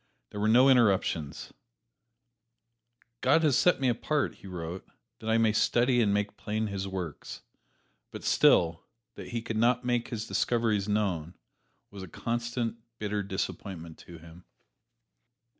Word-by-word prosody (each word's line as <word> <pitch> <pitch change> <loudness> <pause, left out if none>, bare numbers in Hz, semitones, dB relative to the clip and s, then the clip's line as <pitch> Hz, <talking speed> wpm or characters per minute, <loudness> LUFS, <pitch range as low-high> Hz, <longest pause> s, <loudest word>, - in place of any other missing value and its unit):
There 105 - -6
were 105 - +1
no 125 +4 +6
interruptions 100 - +2 1.7
"God 145 +6 +4
has 145 -5 +3
set 180 - +3
me 135 - +1
apart," 135 +5 0
he - - -13
wrote, 90 0 -6 0.4
"that 110 - -5
I 110 - +3
may 110 -2 +3
study 120 +2 +3
and 105 -3 +2
make 105 0 -1
plain 110 +1 -2
His 100 -2 -4
works." 90 -5 -6 0.7
But - - -9
still, 85 -1 +3 0.3
that - - -9
he 115 -1 -4
could 115 -1 -4
not 125 +2 +2
make 120 -1 0
his 110 -2 -5
discoveries 110 -4 0
known 95 -6 -1 0.6
was 100 - -9
a 95 - -7
constant, 115 +4 -3 0.2
bitter 105 -1 -2
disappointment 95 -3 -5
to 85 - -12
him. 85 +2 -15
105 Hz, 140 wpm, -29 LUFS, 95-120 Hz, 1.7 s, no